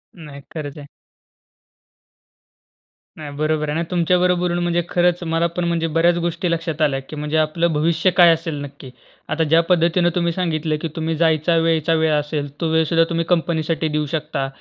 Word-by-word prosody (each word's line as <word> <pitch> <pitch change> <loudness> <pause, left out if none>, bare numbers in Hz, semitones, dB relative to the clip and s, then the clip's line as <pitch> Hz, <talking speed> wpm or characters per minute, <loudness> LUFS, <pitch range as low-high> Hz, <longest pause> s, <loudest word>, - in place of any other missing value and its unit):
नाही 150 -5 -11
खरंच 150 -2 -6
आहे. 145 -1 -10 2.3
नाही, 150 -2 -8
बरोबर 155 0 -1
आहे 150 - -2
ना. 165 - 0
तुमच्या 180 0 +2
बरोबर 180 0 +2
बोलून 175 -1 -1
म्हणजे 175 0 +1
खरंच 175 0 +1
मला 165 +1 +2
पण 180 - -1
म्हणजे 165 -1 0
बऱ्याच 170 +1 +3
गोष्टी 170 +1 -2
लक्षात 165 -1 -3
आल्या 140 -3 +2
की - - -7
म्हणजे 150 +1 -2
आपलं 160 +2 +1
भविष्य 165 +4 +1
काय 175 -1 +8
असेल 165 -1 -4
नक्की. 140 -1 -10 0.4
आता 165 - 0
ज्या 165 +2 +4
पद्धतीने 175 0 +3
तुम्ही 170 -1 +1
सांगितलं 160 -3 -1
की - - -2
तुम्ही 160 0 -2
जायचा 160 +1 +2
वेयचा 165 -1 +1
वेळ 160 -1 +2
असेल, 150 0 -1
तो 165 - +1
वेळसुद्धा 160 +1 +3
तुम्ही 165 -1 -1
कंपनीसाठी 165 -2 0
देऊ 150 0 -1
शकता 155 -3 -2
165 Hz, 175 wpm, -20 LUFS, 155-170 Hz, 2.3 s, काय